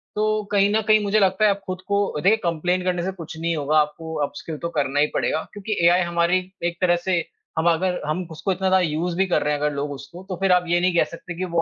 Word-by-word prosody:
तो 215 0 +1
कहीं 200 -1 +4
न 220 - +3
कहीं 215 0 +6
मुझे 205 +1 +2
लगता 190 +1 +2
है - - +6
आप 200 - -2
खुद 185 0 -5
को 200 0 +2
अ, 150 - -4
देखिए 200 +6 +4
कंप्लेंट 175 +2 0
करने 180 -1 -1
से 190 - -1
कुछ 165 -4 -9
नहीं 165 0 -1
होगा, 150 0 +1
आपको 155 +2 -2
अपस्किल 150 +2 -7
तो 170 - -4
करना 140 0 +1
ही 150 - +4
पड़ेगा। 160 - 0
क्योंकि 205 +1 -4
एआई 175 +2 +5
हमारी 170 +1 +2 0.3
एक 170 0 -2
तरह 175 -1 +4
से 175 -3 +2 0.3
हम 160 +2 +3
अगर 180 +2 0
हम 170 +3 -2
उसको 160 +5 -2
इतना 190 +1 -1
ज्यादा 190 0 +4
यूज़ 165 +3 -2
भी 190 - +3
कर 180 - +1
रहे 150 - +1
हैं 145 - -2
अगर 150 +1 0
लोग 145 +1 -3
उसको, 140 +6 -9
तो 185 - -2
फिर 195 -1 +3
आप 180 0 +4
ये 175 +1 +2
नहीं 180 0 +1
कह - - +5
सकते 170 +1 -8
कि 185 - -2
वो 170 -2 0
175 Hz, 275 wpm, -23 LUFS, 160-190 Hz, 0.3 s, कहीं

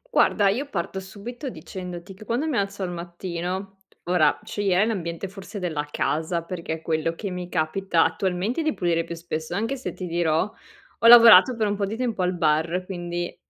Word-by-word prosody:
Guarda, 205 -2 +4
io 265 +8 -2
parto 180 -3 -3
subito 220 +8 -7
dicendoti 180 -4 -8
che 195 +3 -13
quando 235 +7 -1
mi 305 - -1
alzo 200 -2 -1
al 180 - -3
mattino 180 +2 -5 0.2
ora 175 -4 +2
sceglierei 195 -1 +1
l'ambiente 180 -5 -3
forse 195 +2 -9
della 160 -6 -3
casa, 160 +3 -1
perché 170 -1 -5
è 160 - -6
quello 165 0 -1
che 200 +2 -5
mi 180 -1 -5
capita 165 +2 +1
attualmente 190 - -1
di 310 -1 0
pulire 170 -2 0
più 170 0 -6
spesso, 165 0 -5
anche 225 +7 -1
se 265 - -5
ti 185 - -6
dirò, 170 +2 0 0.5
ho 230 - +4
lavorato 230 -1 +9
per 220 -1 0
un 205 0 0
po' 200 -1 -1
di 215 - -4
tempo 235 -5 -1
al 180 0 0
bar, 160 +2 +1
quindi 175 -2 -4
185 Hz, 185 wpm, -24 LUFS, 170-205 Hz, 0.5 s, lavorato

